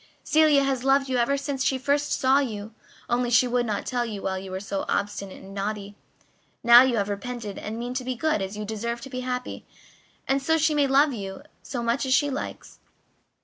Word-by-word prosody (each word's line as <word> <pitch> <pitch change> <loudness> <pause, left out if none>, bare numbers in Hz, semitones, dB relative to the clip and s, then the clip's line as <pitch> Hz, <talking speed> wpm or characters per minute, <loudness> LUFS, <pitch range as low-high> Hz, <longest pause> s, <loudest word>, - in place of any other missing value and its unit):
"Celia 305 -3 +4
has 270 -2 -1
loved 270 0 +3
you 255 - +1
ever 245 +4 +2
since 280 -1 -3
she 265 - +1
first 285 +2 0
saw 265 +1 +3
you, 220 -5 -4 0.3
only 245 0 0
she 245 +1 +4
would 245 0 0
not 210 - -2
tell 245 -2 -1
you 215 -4 -5
while 190 0 -2
you 190 0 -8
were 185 0 -4
so 195 0 -3
obstinate 200 -1 -3
and 195 0 -11
naughty. 200 0 -4 0.7
Now 235 +1 +9
you 255 -2 +2
have 200 -1 0
repented 210 +1 -5
and 220 +1 -5
mean 240 +1 -4
to 255 0 -3
be 255 0 -3
good 305 -4 0
you 210 0 -5
deserve 235 +2 -4
to 270 - -9
be 255 - -4
happy, 250 0 -4 0.6
and 270 +1 +1
so 320 +4 +2
she 315 0 +2
may 290 -2 +3
love 275 +2 +4
you 195 -4 -6 0.2
as 275 - -9
much 240 +3 0
as 260 - +4
she 285 0 +2
likes." 275 - -6
245 Hz, 215 wpm, -25 LUFS, 210-270 Hz, 0.7 s, Now